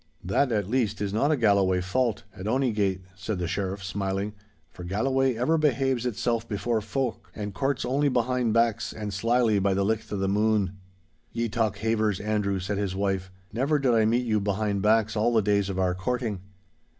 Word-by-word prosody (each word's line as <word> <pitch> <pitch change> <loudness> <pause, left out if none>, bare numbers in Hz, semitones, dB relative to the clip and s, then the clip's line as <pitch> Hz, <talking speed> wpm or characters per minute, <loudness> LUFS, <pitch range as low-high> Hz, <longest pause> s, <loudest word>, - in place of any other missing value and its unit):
'That, 120 +9 +1
at 105 -4 0
least, 110 -3 0
is 100 -1 -2
not 125 +7 +2
a 155 - +2
Galloway 100 -5 +3
fault, 110 +5 0
at 100 0 -6
ony 130 +2 +1
gate,' 95 -3 0
said 95 +3 -4
the 90 -1 -2
Sheriff, 95 +2 -3
smiling, 95 +1 -2 0.4
'for 90 - -10
Galloway 130 +7 +1
ever 130 +8 +1
behaves 135 -4 +1
itself 115 0 -1
before 110 +1 -1
folk, 130 +2 -3
and 105 -1 -5
courts 135 +4 -1
only 140 +3 +2
behind 125 -1 +1
backs 115 0 +1
and 105 -2 -5
slily 115 +1 +2
by 95 0 +1
the 100 0 +1
licht 110 +1 -1
of 105 - -1
the 95 0 0
moon.' 105 -1 +1 0.6
'Ye 115 0 -1
talk 110 -2 0
havers, 110 -3 0
Andrew,' 105 -2 0
said 100 +2 -2
his 100 -2 -2
wife. 95 -1 -1 0.2
'Never 135 +7 +1
did 135 -4 +2
I 110 -1 +4
meet 120 +3 +2
you 110 -2 +1
behind 100 0 -1
backs 110 +1 +3
all 110 +3 +2
the 110 - +5
days 100 -1 +1
of 95 - -3
our 90 -1 +1
courting. 110 +2 -2
105 Hz, 195 wpm, -26 LUFS, 100-120 Hz, 0.6 s, the